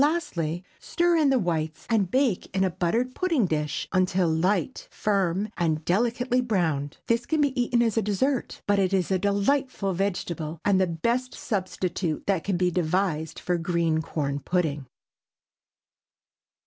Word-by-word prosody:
Lastly 180 - -1 0.2
stir 345 0 +1
in 310 -4 +4
the 265 - +4
whites, 160 -6 -2
and 210 -6 +1
bake 255 -4 +1
in 190 - +3
a 190 - +1
buttered 215 +8 0
pudding 330 - +1
dish, 150 -2 -2
until 185 -1 +2
light, 180 +8 0
firm, 195 -1 0
and 160 -2 0
delicately 245 +6 +1
browned. 160 - -1
This 235 +1 0
can 315 - +1
be 275 -3 +2
eaten 240 0 +2
as 225 -1 0
a - - +4
dessert, 230 +7 -1
but 205 0 +2
it 190 0 +1
is 190 -1 +1
a 190 - +2
delightful 205 +1 0
vegetable, 170 -4 -2
and 195 -2 +4
the 185 - +3
best 235 +10 -1
substitute 185 -5 -2
that 190 -4 +1
can 195 -3 0
be 180 0 +2
devised 170 -2 0
for 175 -1 -1
green 165 -2 +1
corn 145 -3 -2
pudding. 150 -3 -1
190 Hz, 155 wpm, -26 LUFS, 170-235 Hz, 0.2 s, in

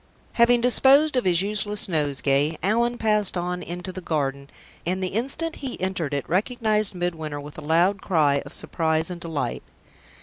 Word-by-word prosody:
Having 235 0 +4
disposed 270 +4 +5
of 250 - +1
his 180 0 +3
useless 210 0 0
nosegay, 145 -2 0
Allan 235 +5 +1
passed 210 -4 +1
on 180 +1 -3
into 180 +2 -6
the 185 - -8
garden, 140 -4 -2 0.3
and 185 +2 -2
the 185 - -1
instant 275 - -3
he 265 -3 -6
entered 185 -5 -2
it 140 -1 -3
recognized 215 +1 +1
Midwinter 160 -4 -3
with 145 +1 -10
a - - -8
loud 175 +6 +2
cry 145 -6 +2
of 140 - -11
surprise 160 0 0
and 175 -1 -7
delight. 145 - -3
180 Hz, 165 wpm, -24 LUFS, 155-215 Hz, 0.3 s, disposed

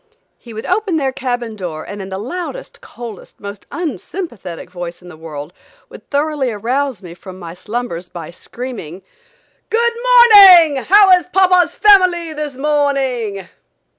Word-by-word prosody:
He 235 - -13
would 220 0 -7
open 370 -2 0
their 270 -3 -1
cabin 245 -4 -4
door 170 -6 -6
and 205 0 -8
in 190 - -8
the 190 - -5
loudest, 355 - -7
coldest, 235 -5 -11
most 200 -1 -9
unsympathetic 300 - -6
voice 175 -1 -7
in 180 - -12
the 170 - -12
world, 155 0 -9 0.4
would - - -15
thoroughly 290 -2 -1
arouse 240 +1 -2
me 170 -2 -10
from 185 +1 -12
my 170 -3 -9
slumbers 185 -3 -5
by 170 -2 -9
screaming: 195 -4 -9 0.7
"Good 470 +1 +1
morning. 415 - +7
How 390 +7 +5
is 360 -1 +4
papa's 365 -1 +3
family 365 -5 +4
this 300 -3 -6
morning?" 270 -9 -1
255 Hz, 145 wpm, -16 LUFS, -, 0.7 s, morning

